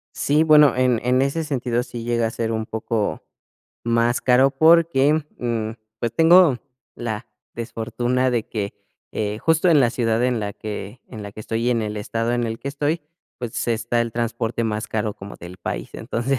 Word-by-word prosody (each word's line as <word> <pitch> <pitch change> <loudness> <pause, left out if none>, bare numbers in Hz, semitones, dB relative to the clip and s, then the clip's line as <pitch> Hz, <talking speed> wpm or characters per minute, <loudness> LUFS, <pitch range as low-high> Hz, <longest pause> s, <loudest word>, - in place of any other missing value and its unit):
Sí, 150 +2 +2
bueno, 150 -3 +6
en 125 -3 +2
en 125 +1 +3
ese 140 +4 0
sentido, 125 -5 -1
sí 120 -2 -7
llega 120 -1 +1
a 110 - -2
ser 115 0 -2
un 110 0 -2
poco 110 -1 -2 0.6
más 115 +1 +2
caro, 130 +2 +4
porque, 160 -1 +4 0.3
mm, 115 -2 -2 0.3
pues, 115 -1 -1
tengo 165 -3 +6 0.4
la 115 -1 -4 0.3
"desfortuna" 120 +2 -1
de 120 -3 -1
que, 100 -3 -3 0.4
eh, 105 0 -2
justo 160 +2 +3
en 155 -4 +6
la 120 - +4
ciudad 115 -1 +1
en 125 -3 +1
la 100 -1 -3
que 105 +3 -7
en 110 -4 -8
la 100 0 -8
que 110 - -9
estoy 115 +2 -2
y - - +3
en 115 -2 +1
el 105 0 -4
estado 115 +2 -2
en 120 0 0
el 115 0 -3
que 140 - -5
estoy, 150 +3 -1 0.4
pues, 120 -1 -3
está 120 +1 0
el 115 -1 -2
transporte 115 0 -2
más 110 0 -2
caro 105 -1 -2
como 100 +1 -10
del 90 +2 -11
país, - - -4
entonces, 125 +3 -2
120 Hz, 190 wpm, -22 LUFS, 110-130 Hz, 0.6 s, bueno